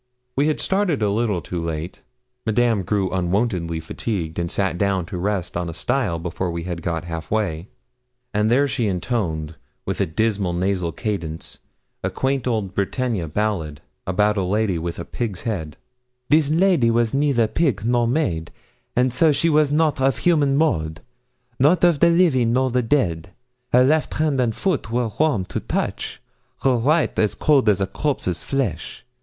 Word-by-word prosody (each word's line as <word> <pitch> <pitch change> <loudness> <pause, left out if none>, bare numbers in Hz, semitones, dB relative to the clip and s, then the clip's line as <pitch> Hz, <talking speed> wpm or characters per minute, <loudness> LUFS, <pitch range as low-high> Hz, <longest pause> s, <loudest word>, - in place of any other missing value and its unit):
We 140 +3 +2
had 155 - 0
started 190 - +1
a 100 - +2
little 105 -4 0
too 85 0 -4
late; 80 +2 -5 0.5
Madame 110 -1 +2
grew 95 0 -1
unwontedly 90 -2 0
fatigued 85 -1 -4
and 85 0 -1
sat 95 -3 -1
down 100 -3 +1
to 90 - -6
rest 95 -2 -2
on 85 -1 -2
a 80 - -7
stile 120 -5 0
before 85 +2 -3
we 85 0 -4
had 85 -1 -4
got 85 -1 -2
half 80 -1 -6
way; 95 -5 -1 0.7
and 105 +1 +2
there 135 +4 +4
she 120 -4 -1
intoned, 85 -6 -2 0.3
with - - -2
a - - +1
dismal 100 +1 0
nasal 90 -1 0
cadence, 85 -6 -5 0.4
a - - 0
quaint 135 -1 -1
old 105 -6 -1
Bretagne 110 0 -1
ballad, 80 -5 -2 0.3
about 105 +3 +2
a - - +2
lady 100 -1 0
with 85 +1 -4
a 85 - -5
pig's 105 -7 -4
head: 80 -10 -4 0.5
'This 150 -1 +4
lady 165 -6 +3
was 115 -1 +1
neither 135 -4 +2
pig 115 - 0
nor 120 0 +2
maid, 105 - -1 0.5
And 125 0 +2
so 155 +5 +4
she 165 +4 +1
was 150 -1 +3
not 150 -2 +2
of 130 -3 +2
human 145 -1 +2
mould; 80 - 0 0.6
Not 155 +7 +4
of 170 -4 +4
the 170 - +6
living 150 -10 +3
nor 130 0 +2
the 125 +1 +2
dead. 100 - 0 0.4
Her 125 +1 +6
left 150 +4 +2
hand 150 -4 +1
and 115 -3 0
foot 185 - -1
were 120 -1 0
warm 145 -12 +2
to - - -4
touch; - - -3 0.4
Her 130 -2 +4
right 150 +8 +1
as 105 -2 +2
cold 140 -8 +3
as 100 -2 +3
a 95 - +1
corpse's 95 - -2
flesh! 135 -2 -3
110 Hz, 175 wpm, -22 LUFS, 90-135 Hz, 0.7 s, the